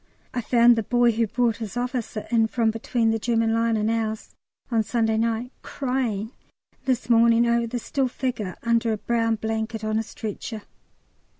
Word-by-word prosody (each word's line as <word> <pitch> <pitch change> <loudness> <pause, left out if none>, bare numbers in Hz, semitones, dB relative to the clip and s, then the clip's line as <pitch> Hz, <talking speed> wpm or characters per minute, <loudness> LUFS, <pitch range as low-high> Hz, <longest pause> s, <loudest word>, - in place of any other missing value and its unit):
I 245 - -1
found 235 +1 +5
the - - +2
boy 240 +2 +3
who 225 0 0
brought 235 0 +1
his 225 0 -6
officer 245 -3 -3
in 225 -1 +4
from 225 -1 +1
between 225 0 0
the 225 - 0
German 225 0 +1
line 230 0 +2
and 215 +1 +1
ours, 220 -1 -3 0.4
on 230 -1 +3
Sunday 225 0 0
night, 230 +2 -1
crying 250 -6 -2 0.5
this 255 -2 0
morning 235 0 +5
over 235 0 +2
the 245 +2 -3
still 265 +3 -1
figure 240 -7 -3
under 230 -1 +2
a - - -2
brown 230 +1 0
blanket 220 0 -3
on 215 0 0
a - - -1
stretcher. 220 0 -6
230 Hz, 175 wpm, -24 LUFS, 220-240 Hz, 0.5 s, found